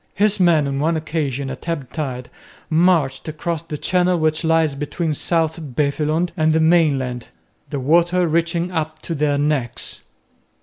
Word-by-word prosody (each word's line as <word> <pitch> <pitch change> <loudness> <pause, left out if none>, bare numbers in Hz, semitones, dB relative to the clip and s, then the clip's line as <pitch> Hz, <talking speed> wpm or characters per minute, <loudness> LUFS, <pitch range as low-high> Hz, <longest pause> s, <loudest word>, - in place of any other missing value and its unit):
His 210 0 +2
men 165 -5 +4
on 135 0 -2
one 160 +3 +1
occasion 140 -4 -3
at 170 - -7
ebb 145 -7 -4
tide 130 -5 -4 0.4
marched 160 -5 +2
across 160 +1 -3
the 155 -2 -6
channel 180 +2 +1
which 155 0 0
lies 160 -2 +2
between 150 +3 -2
South 160 +1 0 0.2
Beveland 155 +4 0
and 155 -2 +2
the 160 - +3
mainland, 145 -7 +2 0.4
the 145 - -3
water 170 +6 +3
reaching 170 +2 0
up 155 -2 -3
to 170 - -3
their 145 -2 +1
necks. 145 -5 -1
155 Hz, 155 wpm, -20 LUFS, 145-170 Hz, 0.4 s, men